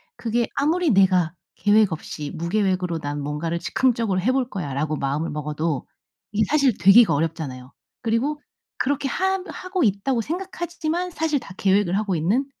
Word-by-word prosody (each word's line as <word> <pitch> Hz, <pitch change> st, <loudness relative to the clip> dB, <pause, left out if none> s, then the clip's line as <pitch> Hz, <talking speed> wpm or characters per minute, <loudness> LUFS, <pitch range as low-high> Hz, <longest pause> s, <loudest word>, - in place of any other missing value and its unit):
그게 235 Hz, 0 st, -1 dB
아무리 315 Hz, +2 st, +2 dB
내가 185 Hz, -5 st, +4 dB, 0.2 s
계획 205 Hz, -2 st, +4 dB
없이 150 Hz, -2 st, -5 dB
'무계획으로 180 Hz, -1 st, 0 dB
난 145 Hz, 0 st, -4 dB
뭔가를 160 Hz, +4 st, -2 dB
즉흥적으로 230 Hz, -2 st, +1 dB
해 250 Hz, +7 st, +2 dB
볼거야.' 210 Hz, -, -2 dB
라고 155 Hz, +3 st, -1 dB
마음을 145 Hz, +4 st, -2 dB
먹어도 150 Hz, -1 st, -2 dB, 0.4 s
이게 215 Hz, +1 st, +2 dB
사실 280 Hz, -6 st, +3 dB
되기가 195 Hz, +5 st, +7 dB
어렵잖아요. 145 Hz, -4 st, -3 dB, 0.3 s
그리고 250 Hz, +6 st, 0 dB, 0.4 s
그렇게 280 Hz, +1 st, 0 dB
하 380 Hz, +5 st, 0 dB
하고 370 Hz, -2 st, -3 dB
있다고 230 Hz, +3 st, +1 dB
생각하지 345 Hz, -, -5 dB
지만 345 Hz, +3 st, -1 dB
사실 320 Hz, -3 st, 0 dB
다 195 Hz, -, -11 dB
계획을 195 Hz, -1 st, +2 dB
하고 205 Hz, -3 st, 0 dB
있는 200 Hz, -, +1 dB
205 Hz, 365 characters per minute, -23 LUFS, 165-270 Hz, 0.4 s, 되기가